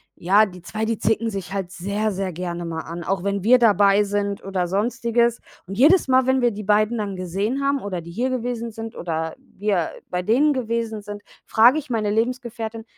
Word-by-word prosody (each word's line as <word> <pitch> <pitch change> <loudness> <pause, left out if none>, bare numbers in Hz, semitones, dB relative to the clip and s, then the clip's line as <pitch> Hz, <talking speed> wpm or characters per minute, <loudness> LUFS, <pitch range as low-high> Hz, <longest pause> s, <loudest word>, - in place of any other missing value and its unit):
ja, 200 +5 +4
die 180 -3 -11
2, 215 +5 -5
die 220 -1 0
zicken 225 +1 +1
sich 195 -3 -6
halt 190 -3 -3
sehr, 200 +4 -2
sehr 190 -1 -3
gerne 175 0 -4
mal 160 -1 -4
an, 170 +1 -7
auch 195 -2 -1
wenn 200 -1 -2
wir 250 +2 +6
dabei 205 -3 +5
sind 200 0 -2
oder 190 -2 -1
Sonstiges. 235 +3 +1 0.3
Und 195 +1 -6
jedes 300 +3 +5
Mal, 260 0 +4
wenn 260 0 +3
wir 240 -1 +3
die 210 0 -7
beiden 215 +3 +2
dann 205 -2 -3
gesehen 195 +9 -2
haben 280 0 +1
oder 185 -4 -4
die 170 +1 -10
hier 245 +8 -1
gewesen 240 -2 -3
sind 225 +1 -7
oder 160 -1 -3
wir 195 -5 -2 0.2
bei 180 0 -1
denen 255 +10 +3
gewesen 230 -4 -2
sind, 205 0 -8 0.2
frage 240 +6 +5
ich 285 - -11
meine 220 -4 0
Lebensgefährtin: 225 -1 -2
210 Hz, 205 wpm, -22 LUFS, 190-235 Hz, 0.3 s, wir